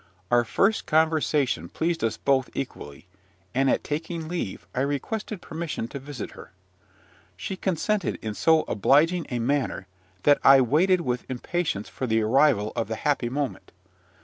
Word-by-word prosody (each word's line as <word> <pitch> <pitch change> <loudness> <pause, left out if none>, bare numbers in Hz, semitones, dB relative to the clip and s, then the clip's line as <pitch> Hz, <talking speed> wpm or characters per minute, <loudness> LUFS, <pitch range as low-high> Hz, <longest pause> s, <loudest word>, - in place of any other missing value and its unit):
Our 120 0 +5
first 195 - +1
conversation 155 - +1
pleased 165 -2 -2
us 110 -1 0
both 135 -2 +1
equally; 75 - -6 0.5
and, 135 +1 +2
at - - +1
taking 160 +2 -4
leave, 170 - -4
I 130 - -1
requested 175 +8 -3
permission 160 -7 -4
to 140 - -6
visit 135 -4 -7
her. - - -13 0.8
She 100 - -4
consented 190 +2 -1
in 110 -1 -4
so 160 +8 +4
obliging 155 - +2
a 125 - -2
manner, 125 -4 -1 0.4
that 145 - +5
I 135 0 +8
waited 170 +9 +3
with 125 -5 -3
impatience 130 - -2
for 130 - -5
the 110 -1 +2
arrival 120 -2 +3
of 115 - -1
the 110 - -3
happy 135 -1 0
moment. 140 +1 -4
140 Hz, 150 wpm, -25 LUFS, 120-160 Hz, 0.8 s, I